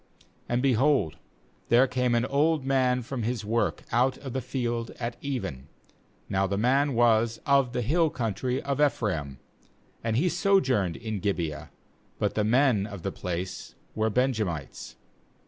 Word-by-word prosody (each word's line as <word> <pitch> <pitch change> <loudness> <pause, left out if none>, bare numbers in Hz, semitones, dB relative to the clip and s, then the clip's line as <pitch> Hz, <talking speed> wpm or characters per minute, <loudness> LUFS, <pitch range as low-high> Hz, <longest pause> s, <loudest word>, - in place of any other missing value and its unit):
16And, 120 +1 +1
behold, 130 - +2 0.5
there 120 +3 +6
came 125 -2 0
an 120 +1 +2
old 145 +1 +1
man 130 -2 +2
from 125 +1 -4
his 115 -1 -2
work 115 +2 0
out 125 +3 +2
of 135 -4 -8
the 130 - -1
field 120 -2 -2
at 120 0 -3
even; 115 - -4 0.6
now 95 0 +1
the 100 +1 -2
man 135 +5 +2
was 115 -1 +3
of 140 -3 +3
the 120 0 -2
hill 160 +6 +2
country 125 +1 -2
of 140 +1 -1
Ephraim, 80 - 0 0.7
and 115 -1 0
he 165 +8 +2
sojourned 130 - +2
in 110 -2 -4
Gibeah; 85 -6 -2 0.5
but - - 0
the 105 - 0
men 115 -2 +3
of 100 -4 -9
the 95 - -2
place 90 0 -5 0.2
were 110 0 0
Benjamites. 110 - -2
120 Hz, 150 wpm, -27 LUFS, 105-130 Hz, 0.7 s, there